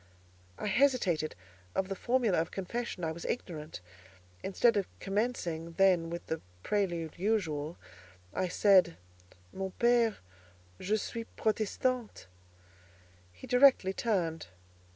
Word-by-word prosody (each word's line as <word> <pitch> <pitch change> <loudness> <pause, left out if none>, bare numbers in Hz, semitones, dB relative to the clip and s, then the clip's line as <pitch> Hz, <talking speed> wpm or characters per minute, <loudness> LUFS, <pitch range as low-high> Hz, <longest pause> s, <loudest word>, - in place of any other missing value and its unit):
I - - -5
hesitated; 210 - +2 0.4
of 190 - 0
the 195 - -3
formula 235 -5 +2
of 165 - -4
confession 195 0 -4
I 160 - 0
was 165 +1 -7
ignorant: 155 - -5 0.6
instead 230 +4 +3
of 200 -2 0
commencing, 195 -6 -2
then, 180 -2 +3
with 170 +1 -5
the 160 - -3 0.2
prelude 175 -6 -1
usual, 170 -7 -1 0.6
I 185 - 0
said:—"Mon 90 - 0
père, 235 -2 +4 0.6
je 210 +3 +1
suis 230 +2 -5
Protestante." 220 +2 -1 1.1
He 90 - -12
directly 250 -6 +5
turned. 175 -8 -1
190 Hz, 110 wpm, -31 LUFS, 165-225 Hz, 1.1 s, directly